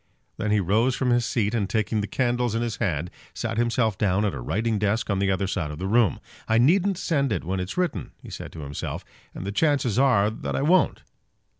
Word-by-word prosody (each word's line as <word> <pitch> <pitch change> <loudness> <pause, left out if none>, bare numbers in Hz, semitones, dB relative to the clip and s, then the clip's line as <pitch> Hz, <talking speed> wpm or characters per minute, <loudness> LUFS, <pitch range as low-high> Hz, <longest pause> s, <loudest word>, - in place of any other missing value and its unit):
Then 105 - -2
he 105 0 +3
rose 110 +7 +2
from 125 -2 0
his 120 -1 +2
seat, 110 -2 0
and 105 -5 0
taking 110 -1 0
the 100 - -3
candles 120 -2 0
in 115 - 0
his 115 -3 -3
hand, 85 -5 -1 0.2
sat 115 -1 -2
himself 115 -3 +1
down 100 0 +2
at 100 - 0
a 65 - -5
writing 110 - -1
desk 105 +2 0
on 100 - 0
the 100 0 +1
other 95 0 +1
side 90 -5 -2
of 75 - -6
the 95 - -4
room. 110 - +3 0.3
"I 110 - +3
needn't 180 +10 +3
send 140 - 0
it - - -1
when 95 +3 -2
it's 90 - -5
written," 175 - -1
he - - -12
said - - -7
to 80 - -8
himself, 70 0 -5 0.3
"and - - -6
the 100 - -2
chances 130 -2 +1
are 110 -6 +4
that 110 - -4
I - - 0
won't." 175 +2 +3
110 Hz, 235 wpm, -25 LUFS, 95-120 Hz, 0.3 s, are